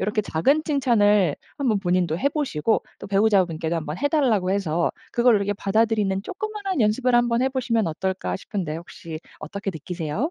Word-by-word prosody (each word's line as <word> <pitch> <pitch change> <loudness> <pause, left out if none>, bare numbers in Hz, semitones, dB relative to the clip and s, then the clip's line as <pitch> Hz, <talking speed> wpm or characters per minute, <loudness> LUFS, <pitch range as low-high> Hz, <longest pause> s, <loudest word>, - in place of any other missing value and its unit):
요렇게 210 +1 0
작은 270 - +2
칭찬을 210 - +3 0.2
한번 235 -8 +1
본인도 175 -3 +1
해 280 - +3
보시고 255 - 0 0.2
또 - - -8
배우자분께도 190 -6 +2
한번 155 -1 -4
해 285 - +1
달라고 240 - +2
해서 170 -4 0 0.2
그걸 240 -1 +4
이렇게 200 0 0
받아들이는 205 -1 +1
쪼끄마한 395 - -4
연습을 240 +4 +2
한번 240 0 +2
해 265 - +3
보시면 235 -6 0
어떨까 190 +4 -2
싶은데 185 -6 -4
혹시 165 -1 -8 0.2
어떻게 200 +5 -4
느끼세요? 170 - -3
205 Hz, 410 characters per minute, -24 LUFS, 180-250 Hz, 0.2 s, 그걸